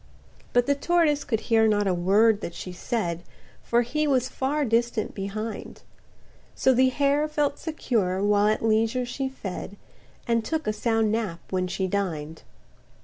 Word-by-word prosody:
But 245 0 +3
the 280 - +3
tortoise 300 0 +2
could 225 -5 -1
hear 225 -2 +3
not 205 -1 +2
a 190 - +2
word 205 +5 +3
that 170 - -6
she 180 - -6
said 175 -3 -2 0.4
For 240 +1 +2
he 300 +6 -1
was 260 -2 +1
far 285 +2 -1
distant 230 -1 0
behind; 215 +3 -6 0.7
So 265 - +3
the 260 +1 +4
hare 285 +3 +1
felt 295 -2 -1
secured 215 - -1
while 205 0 +3
at 215 +1 +1
leisure 225 +3 +2
she 265 +2 -3
fed, 205 -5 -7 0.5
And 230 -1 +1
took 315 +5 -2
a 215 - 0
sound 225 0 +1
nap 215 -7 -2
when 185 -1 0
she 190 +1 -2
dined. 165 -5 -3
225 Hz, 160 wpm, -25 LUFS, 200-265 Hz, 0.7 s, the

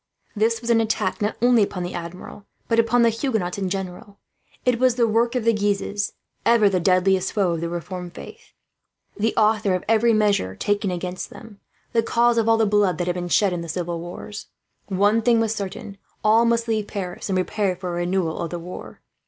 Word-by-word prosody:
This 225 +2 +1
was 235 0 -1
an 225 -1 +4
attack 215 -4 -1
not 210 +1 0
only 245 -2 +5
upon 190 -3 -1
the 175 - -5
Admiral 175 +4 -8 0.2
but 230 0 +2
upon 235 +1 +3
the 230 - +4
Huguenots 220 -6 -2
in 190 -2 -1
general. 195 +1 -6 0.5
It 250 -2 +2
was 255 -2 +3
the 235 -2 +3
work 230 +3 +1
of 250 - 0
the 230 - +4
Guises, 205 0 -1 0.3
ever 230 -3 +5
the 185 -2 +1
deadliest 185 +1 +2
foes 185 -5 +1
of - - -6
the 170 - -2
Reformed 175 +1 -6
faith - - -12 0.6
the 220 +2 0
authors 215 -3 +2
of 185 - -3
every 225 +1 +4
measure 205 - +1
taken 205 -1 0
against 180 0 -4
them, 220 -3 -13 0.3
the 230 - +4
cause 235 +1 +2
of 225 0 +1
all 225 - +5
the 225 - +3
blood 205 -3 +2
that 175 - -1
had 180 - 0
been 175 0 -4
shed 195 +1 +3
in 175 - -3
the 170 - -7
civil 170 0 -3
wars. 175 +5 -8 0.4
One 205 +3 +2
thing 230 0 +3
was 225 -1 +1
certain: 200 -1 -6 0.2
all 220 +2 +5
must 235 0 +1
leave 215 -2 -1
Paris, 185 -1 -5
and 190 - +1
prepare 190 0 0
for 180 0 -6
a 175 - -3
renewal 175 -2 -1
of 170 - -3
the 175 - -4
war. 175 +2 -9
205 Hz, 210 wpm, -23 LUFS, 180-225 Hz, 0.6 s, only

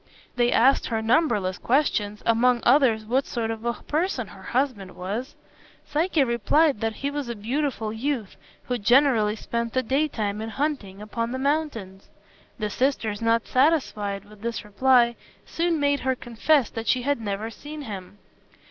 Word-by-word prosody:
They 240 -1 +2
asked 260 +4 +4
her 225 -2 -1
numberless 220 - +1
questions, 210 -6 0
among 240 +1 +3
others 240 -5 +4
what 255 +5 0
sort 225 -2 -2
of 225 0 -6
a 235 - +1
person 295 - -2
her 195 - -13
husband 235 -4 -2
was. 210 +9 -5 0.5
Psyche 315 0 +1
replied 255 +3 +2
that 225 -1 -1
he 280 - 0
was 285 -4 -4
a 235 - -3
beautiful 230 0 -2
youth, 235 -3 -3 0.3
who 245 -1 -2
generally 230 -2 +4
spent 235 +1 -3
the 260 - +1
daytime 230 -6 -1
in 220 - -4
hunting 220 -8 -3
upon 230 +2 -3
the 260 - -2
mountains. 265 -9 -2 0.5
The 210 -2 -3
sisters, 230 -4 0
not 230 0 +2
satisfied 220 - +1
with 210 0 -16
this 235 -1 -4
reply, 235 +2 +3 0.3
soon 335 -1 0
made 285 0 +2
her 260 0 0
confess 245 +3 +1
that 225 0 -6
she 250 -1 +2
had 285 -2 0
never 210 +1 -3
seen 295 +7 -9
him. 200 -4 -8
235 Hz, 160 wpm, -25 LUFS, 215-275 Hz, 0.5 s, asked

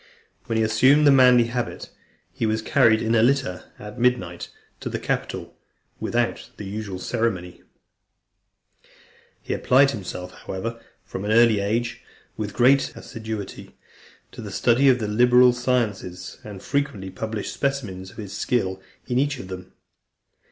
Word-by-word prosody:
When 115 - -1
he 110 - +3
assumed 130 +7 +4
the 145 - +7
manly 125 -2 +6
habit, 120 +1 -4 0.4
he 115 - -1
was 110 0 -1
carried 110 0 +4
in 115 +1 +1
a 115 - +4
litter, 125 -7 +1
at 105 +3 -9
midnight, 105 -9 0 0.3
to - - -5
the - - -3
Capitol, - - -3 0.4
without - - -1
the 105 - -7
usual 100 -1 -5
ceremony. 95 -4 -2
III. - - -29 1.8
He - - -3
applied 135 +2 +4
himself, 90 -5 -6
however, 115 +5 -6 0.2
from 95 - -6
an 105 - -1
early 115 -2 +5
age, 115 +4 -1 0.3
with 105 -2 -5
great 135 +3 +4
assiduity 110 -3 -7 0.5
to - - -9
the - - -7
study 130 +4 +3
of 130 - +5
the 110 -3 -3
liberal 125 +3 +5
sciences, 110 -8 -2
and 100 -2 -9
frequently 105 -10 -2
published 110 +2 -4
specimens 110 -10 -3
of - - -17
his 105 -3 -7
skill 95 -7 -1 0.2
in 125 0 0
each 145 +1 0
of 95 -7 -9
them. 90 -1 -8
110 Hz, 150 wpm, -23 LUFS, 100-125 Hz, 1.8 s, the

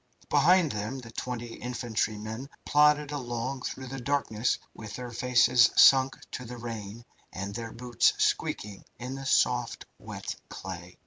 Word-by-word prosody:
Behind 160 +2 +5
them 105 +5 -3
the 120 -3 -10
twenty 120 0 -5
infantrymen 115 0 -3 0.2
plodded 150 0 +4
along 130 -1 -3
through 130 - -5
the 135 +1 -6
darkness 125 -4 0 0.2
with 110 -1 -8
their 125 -1 -6
faces 120 0 +4
sunk 135 0 +7 0.2
to 125 - -5
the 125 0 -8
rain, 115 -1 -7 0.3
and 100 +2 -5
their 115 +1 -5
boots 120 -1 +2
squeaking 100 -1 -1
in 125 +2 -5
the 135 0 -6
soft, - - +1
wet - - -6
clay. 90 -1 -8
120 Hz, 140 wpm, -28 LUFS, 110-135 Hz, 0.3 s, sunk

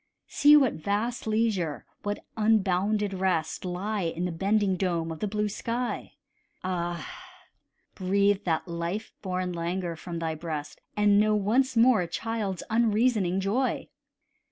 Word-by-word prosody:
See 295 +1 +6
what 270 -5 +3
vast 220 +4 -1
leisure, 215 -8 0 0.2
what 205 0 -4
unbounded 210 -1 +2
rest, 185 -4 -1
Lie 195 +4 -2
in 170 0 -2
the 180 - -2
bending 195 +3 +1
dome 170 -3 -1
of 160 - -6
the 210 - -1
blue 210 +1 -1
sky: 235 +4 -3 0.5
Ah! 175 -3 -2 0.9
breathe 200 +1 +2
that 165 0 0
life 170 +5 -4
born 185 -2 -2
languor 170 0 -2
from 170 +1 -6
thy 165 -1 -2
breast, 155 -2 -6 0.2
And 205 -1 +5
know 215 0 +3
once 240 +5 +2
more 230 -3 +6
a 175 - -2
child's 205 0 -3
unreasoning 220 -4 +2
joy. 230 +7 0
195 Hz, 135 wpm, -27 LUFS, 175-215 Hz, 0.9 s, See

